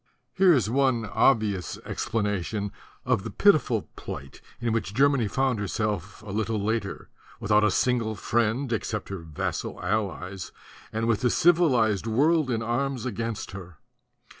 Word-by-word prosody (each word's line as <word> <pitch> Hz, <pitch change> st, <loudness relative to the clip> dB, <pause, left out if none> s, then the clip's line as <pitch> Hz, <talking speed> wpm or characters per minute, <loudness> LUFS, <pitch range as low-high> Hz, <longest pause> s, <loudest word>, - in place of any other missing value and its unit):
Here 190 Hz, -1 st, +5 dB
is 130 Hz, -, +3 dB
one 130 Hz, -2 st, +2 dB
obvious 105 Hz, -3 st, +1 dB
explanation 105 Hz, -1 st, -2 dB, 0.3 s
of -, -, +2 dB
the -, -, -5 dB
pitiful -, -, +3 dB
plight 70 Hz, 0 st, -8 dB, 0.2 s
in 120 Hz, -2 st, -1 dB
which 110 Hz, -3 st, -2 dB
Germany 140 Hz, -4 st, +3 dB
found 130 Hz, +1 st, 0 dB
herself 105 Hz, -1 st, -3 dB
a 105 Hz, -, -7 dB
little 110 Hz, +1 st, -1 dB
later, 105 Hz, -1 st, -2 dB, 0.3 s
without 105 Hz, +1 st, +3 dB
a 105 Hz, -, +4 dB
single 115 Hz, +1 st, +1 dB
friend, 120 Hz, +5 st, 0 dB
except 105 Hz, -1 st, -3 dB
her 100 Hz, -1 st, -4 dB
vassal 80 Hz, -3 st, -4 dB
allies, 95 Hz, -1 st, -2 dB, 0.4 s
and 110 Hz, +1 st, -1 dB
with 115 Hz, -1 st, +1 dB
the 125 Hz, -, +3 dB
civilized 125 Hz, -, +3 dB
world 150 Hz, +6 st, +3 dB
in 115 Hz, -2 st, -1 dB
arms 125 Hz, +2 st, -1 dB
against 115 Hz, -1 st, -3 dB
her. 90 Hz, -4 st, -10 dB
110 Hz, 140 wpm, -26 LUFS, 100-125 Hz, 0.4 s, Here